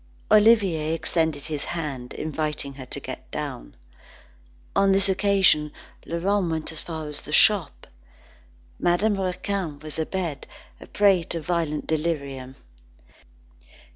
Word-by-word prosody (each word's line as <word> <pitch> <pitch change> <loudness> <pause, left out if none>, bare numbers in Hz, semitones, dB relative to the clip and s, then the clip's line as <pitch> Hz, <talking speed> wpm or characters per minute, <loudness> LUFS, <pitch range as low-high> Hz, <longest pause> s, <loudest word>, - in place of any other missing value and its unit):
Olivier 195 -8 +4
extended 160 -3 0
his 150 -3 -4
hand, 140 -7 -5
inviting 150 -2 -3
her 130 -1 -10
to - - -4
get - - -8
down. - - -6 1.0
On 195 0 +4
this 195 0 +4
occasion, 190 -6 +3 0.4
Laurent 185 +2 0
went 160 -1 -3
as 160 - -5
far 160 -2 -6
as 150 -1 -6
the 150 - -10
shop. 195 +1 +4 0.9
Madame 195 +3 +2
Raquin 185 -3 -2
was 155 +1 -6
abed, 160 -3 -3 0.3
a - - -12
prey 200 -3 +4
to 170 - -3
violent 160 -2 -1
delirium. 140 -5 -2
160 Hz, 120 wpm, -25 LUFS, 150-190 Hz, 1.0 s, Olivier